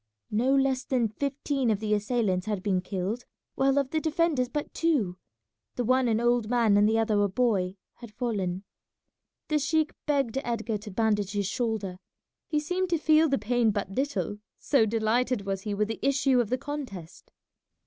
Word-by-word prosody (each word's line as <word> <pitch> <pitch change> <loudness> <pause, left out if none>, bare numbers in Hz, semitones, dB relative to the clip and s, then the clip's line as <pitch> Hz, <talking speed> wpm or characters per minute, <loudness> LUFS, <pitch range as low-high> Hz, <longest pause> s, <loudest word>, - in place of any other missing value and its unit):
No 250 +6 +2
less 270 -1 +2
than 245 -4 0
fifteen 275 +1 -1
of 210 -3 +1
the 215 -1 0
assailants 210 -3 0
had 205 -4 -2
been 190 -3 +1
killed, 195 +5 -3 0.3
while 270 +1 +2
of 275 -2 +1
the 315 - +1
defenders 310 -5 +1
but 295 +2 -4
two, 235 - 0 0.6
the 245 - -1
one 255 +2 +3
an 225 -1 +2
old 240 -2 +1
man 230 -4 +3
and 205 +1 +5
the 225 - +2
other 215 -2 +2
a 205 - +2
boy, 190 -4 +1 0.2
had 235 -3 -11
fallen. 195 -6 -2 0.9
The 305 -1 +2
sheik 310 +2 +1
begged 275 -4 +1
Edgar 230 -2 -2
to 210 +1 -9
bandage 205 -1 0
his 205 -1 0
shoulder; 200 -3 -2 0.5
he 300 - +1
seemed 360 +4 -1
to 340 - +2
feel 310 0 +4
the 275 - +2
pain 230 +2 +1
but 200 -2 -2
little, 205 - -2 0.2
so 250 -7 +2
delighted 225 +1 0
was 195 -1 -2
he 205 0 -3
with 210 +1 +1
the 225 - -4
issue 275 -1 +3
of 225 - -3
the 255 - +1
contest. 250 - -7
230 Hz, 180 wpm, -27 LUFS, 205-270 Hz, 0.9 s, and